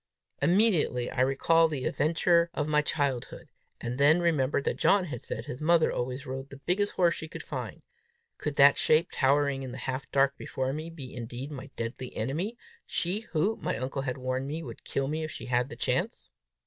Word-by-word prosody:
Immediately 170 - +3
I - - 0
recalled 165 +5 +4
the 140 -4 -3
adventure 170 +3 +2
of 150 - -1
my 150 -1 +3
childhood; 140 -4 -2 0.3
and 120 +2 -4
then 150 +4 +6
remembered 145 -5 +1
that - - -1
John 195 -2 +4
had 125 -8 -6
said - - -5
his 125 - -7
mother 165 +1 +4
always 130 +3 -3
rode 135 +1 -6
the 140 - -10
biggest 185 +8 0
horse 175 -2 +3
she 160 - -6
could - - -8
find: - - -6 0.6
could 150 -1 -3
that 140 0 +7
shape, 160 +3 +3
towering 140 0 +2
in 130 -2 -6
the 125 - -7
half 130 +1 -4
dark 140 0 +3
before 130 0 -3
me, 155 +3 -5
be 145 -6 -9
indeed 125 +3 -6
my 135 -2 -7
deadly 115 +2 -5
enemy 160 - -2 0.3
she 195 +6 -1
who, 195 +8 +1
my - - -2
uncle 130 +3 -3
had 130 -2 -3
warned 130 +1 -2
me, 160 +3 -4
would - - -9
kill 135 -1 -1
me 155 +2 -2
if 155 - -3
she - - -7
had 125 +1 +1
the 120 - -7
chance? 120 - -2
140 Hz, 200 wpm, -29 LUFS, 130-165 Hz, 0.6 s, that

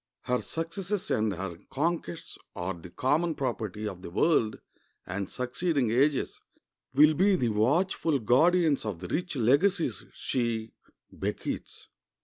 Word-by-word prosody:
Her 125 0 0
successes 180 +4 -3
and 110 -1 +2
her 95 -2 -5
conquests 150 - -2 0.2
are 90 +2 -2
the 85 0 -11
common 150 - +1
property 110 -6 -3
of 90 -3 -6
the 90 - -7
world, 110 - +2 0.5
and 95 +1 -4
succeeding 125 0 0
ages 135 +3 +2 0.5
will 150 +3 +6
be 190 +5 +4
the 125 -9 +1
watchful 145 - +2
guardians 155 +6 +3
of 105 -5 -3
the 90 - -6
rich 175 - -2
legacies 150 - +2
she 115 -3 -2 0.4
bequeathes. - - -4
130 Hz, 125 wpm, -29 LUFS, 110-165 Hz, 0.5 s, will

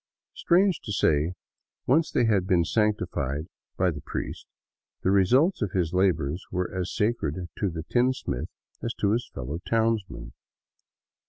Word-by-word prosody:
Strange 180 0 +3
to 105 - -6
say, 80 -3 +2 0.5
once 155 +6 +3
they 120 - +2
had 100 -5 +2
been 85 -3 +3
sanctified 90 - 0 0.3
by 90 -1 +3
the 75 -3 -7
prifest, - - -5 0.6
the 95 - +3
results 125 - +4
of 100 -4 -1
his 85 -3 0
labors 90 -4 +1
were 90 0 -2
as 95 -1 -2
sacred 90 -6 -1
to 100 - -1
the 80 -2 -5
tinsmith 120 - 0 0.3
as 115 - -3
to 100 - +1
his 120 +3 -1
fellow 70 +5 -5
townsmen. 110 - -1
95 Hz, 145 wpm, -26 LUFS, 85-115 Hz, 0.6 s, results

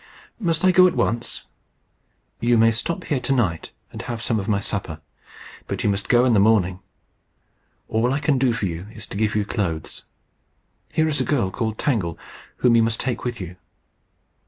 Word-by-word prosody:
"Must 170 -4 0
I 185 - +6
go 185 0 +7
at 180 - -1
once?" 120 +1 -1 0.9
"You 120 0 +3
may 115 +1 +5
stop 170 +10 -2
here 150 -6 -1
to 125 +2 -3
night, 100 -12 0 0.2
and - - -7
have 120 -1 -5
some 115 -1 0
of 95 - -5
my 105 -2 +2
supper. 95 -6 -4 0.7
But - - -3
you 105 - +3
must 100 +1 -3
go 120 0 +5
in 125 - +3
the 105 - +5
morning. 100 -3 +3 1.1
All 115 +3 +1
I 135 - +1
can 140 -2 +1
do 130 -2 +3
for 115 -3 -2
you 85 +1 -4
is 110 - -6
to - - -7
give 105 0 0
you 105 -1 +1
clothes. 85 -8 -3 0.9
Here 160 0 +2
is 150 -2 0
a - - +2
girl 120 -11 0
called 110 +1 -2
Tangle, 100 - -1 0.4
whom 120 -2 +4
you - - +5
must 115 0 0
take 125 -3 -2
with 120 -2 -3
you." 90 -1 -7
115 Hz, 195 wpm, -23 LUFS, 100-130 Hz, 1.1 s, go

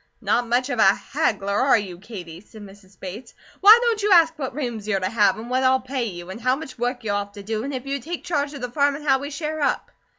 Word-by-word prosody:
"Not 240 0 0
much 250 +3 +1
of 245 - -2
a 195 -1 +6
haggler, 200 0 -2
are 255 +3 +4
you, 185 -5 -6
Katie?" 180 -5 -9
said 215 0 -14
Mrs. 195 -1 -16
Bates. 200 +6 -9 0.2
"Why 420 +3 +9
don't 460 -3 +1
you 415 0 +1
ask 330 -3 +6
what 265 -3 -4
rooms 240 -7 -4
you're 200 -3 +1
to 185 - -1
have, 205 -2 +2
and 225 +2 -8
what 255 +1 0
I'll 260 0 +3
pay 260 -1 -3
you, 175 -3 -7
and 220 +5 -9
how 255 +2 +2
much 270 -4 -9
work 245 0 -2
you'll 205 -2 0
have 200 0 -7
to 205 -1 -10
do, 215 +1 -3
and 275 - -4
if 260 -1 -5
you 275 0 -2
take 335 +6 -6
charge 290 -3 -1
of 280 - -8
the 250 -1 -4
farm, 285 +1 +2
and 295 +1 -9
how 270 -1 +4
we 285 +1 -6
share 305 +1 -4
up?" 285 - -1
245 Hz, 270 wpm, -23 LUFS, 205-280 Hz, 0.2 s, Why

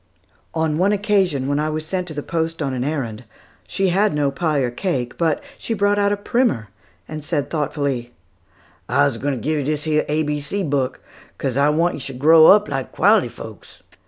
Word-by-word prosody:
On 160 -1 0
one 195 +3 +3
occasion, 195 - +1
when 145 +1 0
I 155 +1 0
was 155 0 -3
sent 180 +2 -3
to 155 - -7
the 145 - -4
post 165 0 -2
on 140 -4 -2
an 125 -1 -2
errand, 130 -6 -3 0.4
she 195 -1 0
had 195 0 +2
no 145 -2 +1
pie 155 +1 -1
or 125 -2 -1
cake; 125 -4 -2
but 165 -3 0 0.2
she 225 - -3
brought 205 0 +2
out 200 0 +2
a 205 - 0
primer 205 - 0 0.4
and 155 -1 -7
said 145 -2 -2
thoughtfully, 140 -5 -2 0.8
"I's 70 +10 +2
g'wine 140 +3 -1
ter - - -5
give 155 +4 0
yo - - -2
dis 150 +1 -2
A 155 0 +1
B 150 0 -2
C 190 +8 -3
book, 140 -5 -1 0.4
'cos 130 -3 -2
I 140 +2 +3
want 165 +4 +2
yo - - -6
should 135 -1 -7
grow 160 +3 +7
up 210 +1 +6
like 135 -2 -4
quality - - +3
folks." - - -12
150 Hz, 205 wpm, -21 LUFS, 140-175 Hz, 0.8 s, grow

